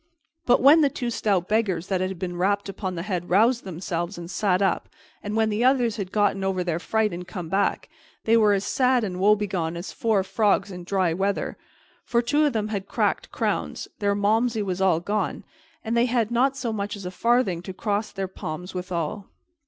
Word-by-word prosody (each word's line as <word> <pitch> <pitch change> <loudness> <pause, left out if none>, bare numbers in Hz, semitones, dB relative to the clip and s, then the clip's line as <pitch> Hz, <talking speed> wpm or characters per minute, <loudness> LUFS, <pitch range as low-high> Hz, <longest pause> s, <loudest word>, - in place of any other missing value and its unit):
But 245 - +5
when 300 +4 +8
the 285 - +4
two 245 -3 -3
stout 195 -6 0
beggars 200 -6 0
that 190 -1 -1
had 185 0 -2
been 175 0 -4
rapped 200 +3 0
upon 190 -1 -4
the 170 - -4
head 180 -3 -3
roused 230 +6 +3
themselves 175 0 -4
and 170 +1 -7
sat 190 -3 +1
up, 195 -1 0 0.3
and 205 +1 -4
when 220 -1 +2
the 210 +3 0
others 245 -4 +3
had 190 -3 -4
gotten 205 -2 +1
over 190 -1 0
their 170 -2 -1
fright 220 +2 0
and 175 +1 -6
come 180 -5 -6
back, 195 +3 0 0.4
they 225 - +3
were 215 -2 +5
as 195 -1 0
sad 255 -2 +2
and 185 -3 -3
woebegone 190 -5 +1
as 175 - -6
four 215 -4 +1
frogs 200 0 +1
in 180 -1 -8
dry 185 -3 +1
weather, 195 +3 -1 0.5
for 235 0 +1
two 295 +5 +2
of 285 - -1
them 215 -1 -1
had 200 -2 -3
cracked - - -1
crowns, - - -2
their 200 -1 +1
Malmsey 220 +2 +1
was 190 -1 -3
all 185 -4 +3
gone, 205 +2 -2 0.4
and 225 +1 -1
they 235 +1 +4
had 235 -2 0
not 260 +3 +2
so 235 -4 -2
much 205 0 -3
as 200 -2 -9
a 180 - -4
farthing 225 -4 +1
to 185 - -7
cross 205 +2 -2
their 195 -1 -3
palms 180 0 -7
withal. 180 +1 -4
200 Hz, 205 wpm, -25 LUFS, 185-220 Hz, 0.5 s, when